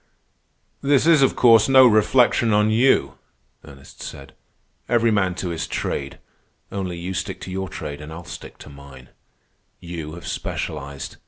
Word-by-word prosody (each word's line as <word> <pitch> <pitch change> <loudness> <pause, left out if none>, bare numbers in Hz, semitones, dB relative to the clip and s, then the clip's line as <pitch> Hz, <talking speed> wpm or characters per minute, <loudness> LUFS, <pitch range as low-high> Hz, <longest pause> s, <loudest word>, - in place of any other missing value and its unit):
"This 140 0 +2
is, 165 -3 +5
of 135 - +3
course, 115 -1 +5
no 130 -1 +7
reflection 115 0 +3
on 105 +1 +3
you," 110 - +2 0.4
Ernest 70 -1 -15
said. 70 -1 -9 0.6
"Every 115 -1 +3
man 95 -4 +1
to 90 - -4
his 80 -1 -4
trade. 70 0 -4 0.5
Only 95 -3 -4
you 90 +2 -5
stick 95 +2 -4
to 95 - -7
your 95 0 -4
trade, 75 -1 -7
and 75 +1 -9
I'll 85 +2 -9
stick 90 +1 -10
to - - -12
mine. 70 -2 -14 0.7
You 85 -3 -7
have 85 - -11
specialized. 70 -2 -5
90 Hz, 155 wpm, -22 LUFS, 75-115 Hz, 0.7 s, no